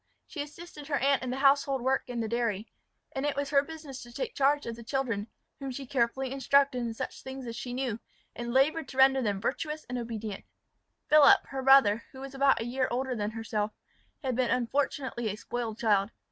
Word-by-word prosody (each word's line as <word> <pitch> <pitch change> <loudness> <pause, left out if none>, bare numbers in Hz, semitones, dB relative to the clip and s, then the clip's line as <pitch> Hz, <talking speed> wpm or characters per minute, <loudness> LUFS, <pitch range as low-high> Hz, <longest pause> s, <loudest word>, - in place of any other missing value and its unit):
She 295 - -6
assisted 300 0 -9
her 295 - 0
aunt 275 0 +2
in 255 - -4
the 255 - -2
household 275 -1 +3
work 265 +1 0
and 240 -2 -2
the - - -2
dairy; 230 -2 -1 0.4
and 270 -2 -3
it 290 -1 0
was 285 0 -2
her 280 -1 +5
business 295 -3 -9
to 240 - -11
take 480 - -4
charge 285 +1 +2
of 230 - -4
the 235 - -11
children, 230 -5 -2 0.3
whom 275 -1 -5
she 270 +1 -6
carefully 255 0 0
instructed 275 0 +3
in 230 -2 -3
such - - -5
things 265 0 -7
as 230 -1 -5
she 245 - -5
knew, 245 -3 -2 0.4
and 240 0 -4
laboured 285 +4 +2
to 260 - -10
render 265 0 +6
them 205 -4 0
virtuous 300 +7 -3
and 250 0 -3
obedient. 220 -3 -5 0.6
Philip, 300 -2 +7
her 270 -1 -3
brother, 260 -5 +6
who 265 - -10
was 270 0 -8
about 275 0 +3
a 225 - -3
year 255 +2 0
older 255 +1 -1
than 210 -2 -1
herself, 215 -1 -3 0.5
had 260 -3 -1
been 250 -1 +1
unfortunately 255 -1 -1
a 200 - -3
spoiled 230 0 -4
child. 205 -3 +2
260 Hz, 210 wpm, -29 LUFS, 235-275 Hz, 0.6 s, Philip